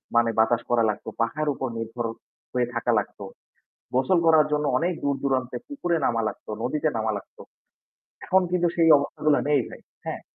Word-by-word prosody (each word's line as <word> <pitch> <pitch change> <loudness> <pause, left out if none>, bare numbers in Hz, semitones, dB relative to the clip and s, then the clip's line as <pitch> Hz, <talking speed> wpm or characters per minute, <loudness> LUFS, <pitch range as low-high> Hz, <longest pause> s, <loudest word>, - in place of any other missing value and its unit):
মানে 115 0 +4
বাতাস 115 +1 +3
করা 120 -1 +3
লাগতো। 105 - -4
পাখার 150 +7 -1
উপর 130 - -3
নির্ভর 115 +1 -4 0.5
হয়ে 125 -1 +1
থাকা 120 0 0
লাগত। 105 - -7 0.8
গোসল 135 +8 +3
করার 160 -2 +6
জন্য 150 0 +1
অনেক 175 +6 0
দূর 140 -1 +1
দূরান্তে 130 -2 0
পুকুরে 175 - -1
নামা 115 -1 +1
লাগত, - - -7 0.2
নদীতে 150 +4 0
নামা 110 0 0
লাগত। - - -13 0.9
এখন 190 +1 +4
কিন্তু 175 -1 +2
সেই 165 -1 +4
অবস্থাগুলা 145 +1 +1
নেই 145 -3 +4
ভাই, - - -11 0.3
হ্যাঁ? - - -4
135 Hz, 170 wpm, -25 LUFS, 120-160 Hz, 0.9 s, করার